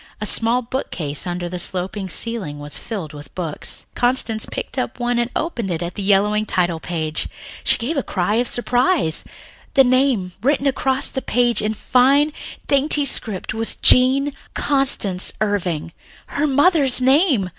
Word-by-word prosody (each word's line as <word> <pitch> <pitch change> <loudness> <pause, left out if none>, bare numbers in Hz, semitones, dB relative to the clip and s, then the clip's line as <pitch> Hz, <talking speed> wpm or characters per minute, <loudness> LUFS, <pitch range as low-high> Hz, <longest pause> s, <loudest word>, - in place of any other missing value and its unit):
A 210 - -3
small 230 +4 +1
bookcase 180 - -3
under 175 0 -3
the 180 +1 -5
sloping 190 +2 -3
ceiling 195 -6 -1
was 145 0 -8
filled 185 -9 -6
with 145 -1 -12
books. 165 -5 -5
Constance 245 -3 0
picked 265 - -5
up 255 - -4
one 240 0 0
and 240 0 0
opened 245 - -3
it 170 -1 -2
at 170 - -5
the 205 - -6
yellowing 205 +2 +2
title 175 -2 0
page. 160 -2 -3 0.4
She - - +3
gave 240 +5 -3
a 315 - 0
little - - -7
cry 190 +2 0
of 245 +1 +1
surprise. 245 - +1 0.5
The 270 - +7
name 255 -7 +1
written 275 +3 +1
across 270 0 +1
the 265 - -4
page 240 -1 +1
in 215 +1 -1
a - - -12
fine, 275 +7 +3 0.3
dainty 285 +1 +4
script 215 -7 0
was 225 +1 0
"Jean 270 +3 +5 0.2
Constance 265 -10 +1
Irving," 180 -7 -2 0.3
her 295 +1 -1
mother's 285 -2 +3
name! 265 - +3
230 Hz, 165 wpm, -20 LUFS, 180-265 Hz, 0.5 s, The